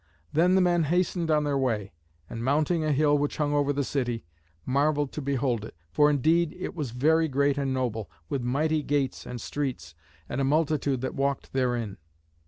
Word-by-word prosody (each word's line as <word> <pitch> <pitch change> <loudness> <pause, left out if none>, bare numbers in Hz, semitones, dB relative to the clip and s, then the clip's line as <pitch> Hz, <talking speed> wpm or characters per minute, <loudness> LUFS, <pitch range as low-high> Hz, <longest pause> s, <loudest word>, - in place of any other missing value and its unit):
Then 175 +4 +4
the 190 - +5
men 175 -2 +3
hastened 175 +1 0
on 150 -1 +3
their 145 -2 0
way, 110 -8 -1 0.3
and 115 +5 -6
mounting 155 +5 +1
a 155 - +1
hill 145 +1 +3
which 145 0 -1
hung 145 -1 0
over 145 -1 +2
the 145 0 0
city, 120 - -2 0.4
marvelled 145 +1 +1
to 150 - -5
behold 130 -5 0
it, 110 - -9 0.2
for 150 - +4
indeed 160 +4 +2
it 185 - -4
was 150 -8 -3
very 160 +7 +2
great 140 0 +2
and 140 -2 -1
noble, 115 -7 -2 0.2
with 135 +8 -2
mighty 150 +6 +1
gates 140 -2 -1
and 125 - -5
streets, 115 - -4 0.3
and 125 - -2
a - - +1
multitude 145 -2 +1
that 130 - -3
walked 140 0 -2
therein. 120 -6 -1
140 Hz, 190 wpm, -27 LUFS, 130-155 Hz, 0.4 s, the